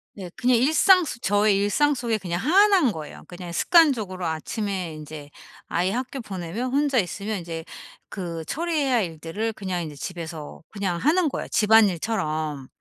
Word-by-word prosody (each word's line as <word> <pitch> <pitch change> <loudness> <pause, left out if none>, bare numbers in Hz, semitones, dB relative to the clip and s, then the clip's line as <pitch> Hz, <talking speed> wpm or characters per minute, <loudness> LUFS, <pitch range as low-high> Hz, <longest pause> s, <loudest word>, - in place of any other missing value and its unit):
네. 190 -3 -8
그냥 250 -1 +3
일상 320 - +5
속 235 -5 -6
저의 205 +1 +3
일상 290 +9 +2
속에 235 -4 -1
그냥 175 -3 -3
하나인 375 - +4
거예요. 155 -5 -9
그냥 175 -1 -8
습관적으로 220 - +3
아침에 180 +2 -3
인제 150 -1 -9 0.4
아이 180 +2 0
학교 255 +4 -4
보내면 200 +5 -5
혼자 280 -1 +1
있으면 200 +1 -1
인제 165 -1 -6 0.5
그 170 -4 -5
처리해야 300 - 0
할 225 - +3
일들을 165 +7 -4
그냥 185 -4 -3
인제 155 -2 -7
집에서 160 -1 -7
그냥 195 -4 -2
하는 315 - +2
거예요, - - -5
집안일처럼. 170 -9 +2
200 Hz, 345 characters per minute, -24 LUFS, 170-255 Hz, 0.5 s, 일상